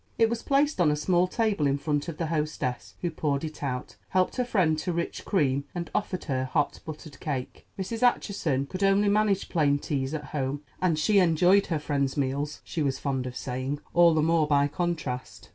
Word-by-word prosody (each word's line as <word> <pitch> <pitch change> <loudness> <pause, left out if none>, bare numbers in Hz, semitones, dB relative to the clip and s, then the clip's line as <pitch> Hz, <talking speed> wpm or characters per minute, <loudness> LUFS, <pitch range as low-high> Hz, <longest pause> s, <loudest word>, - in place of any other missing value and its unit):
It 225 0 +4
was 235 -1 -2
placed 280 -6 +2
on 160 - +5
a 150 - +2
small 175 +4 +2
table 205 -7 +1
in 140 0 +1
front 145 +1 -1
of 165 -3 -5
the 165 - -1
hostess, 155 -5 -2
who 175 - 0
poured 145 -2 -1
it 155 -1 -6
out, 130 -3 -4
helped 185 +4 +1
her 250 - +2
friend 185 -10 +2
to 180 - -2
rich 170 0 -3
cream, 140 -7 +1
and 170 -1 -4
offered 185 -3 -2
her 130 -3 -1
hot 145 +2 0
buttered 155 -2 -8
cake. 135 -5 -5
Mrs. 210 +5 -4
Acheson 190 - +1
could 185 +6 -6
only 195 +1 +4
manage 205 -1 +2
plain 145 -5 +2
teas 140 0 -2
at 150 -1 -5
home, 140 0 -2 0.2
and 175 -4 +2
she 200 +6 +4
enjoyed 180 +3 +4
her 165 - 0
friend's 140 -2 -1
meals, 140 +2 -2
she 165 - -4
was 140 -2 0
fond 130 -3 -2
of 125 - -7
saying, 130 +3 -3
all 170 -1 +6
the 155 - +3
more 165 -1 +3
by 145 -1 +3
contrast. 150 -5 -4
155 Hz, 205 wpm, -27 LUFS, 140-185 Hz, 0.2 s, all